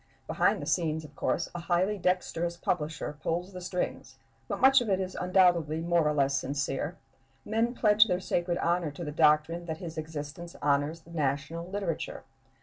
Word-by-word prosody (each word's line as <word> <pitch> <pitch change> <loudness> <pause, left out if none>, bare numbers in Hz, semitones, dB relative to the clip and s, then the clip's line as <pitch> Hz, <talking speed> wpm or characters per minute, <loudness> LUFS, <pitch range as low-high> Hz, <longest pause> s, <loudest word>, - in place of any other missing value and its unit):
Behind - - +2
the 145 - -5
scenes, 160 -1 0
of 145 -1 -14
course, 165 - 0
a 175 - -4
highly 180 +4 +1
dexterous 175 -1 0
publisher 155 -3 -2
pulls 180 +4 -2
the 180 - -7
strings, 180 0 -3 0.3
but - - -3
much 270 0 +7
of 235 - -3
it 190 -1 +2
is 185 -1 -3
undoubtedly 175 -4 +3
more 170 -1 +2
or 150 - +2
less 140 -1 +2
sincere; 140 +4 -2 0.5
men 230 +3 0
pledge 215 -1 +5
their 180 -3 +1
sacred 175 -1 -1
honor 170 -2 +1
to 160 +4 -7
the 150 - -4
doctrine 155 +3 +3
that 160 -1 -3
his 165 -2 -6
existence 155 +2 -7
honors 145 +3 +1
the 165 - -17
national 155 +3 -2
literature. 195 -5 -3
170 Hz, 175 wpm, -29 LUFS, 150-180 Hz, 0.5 s, much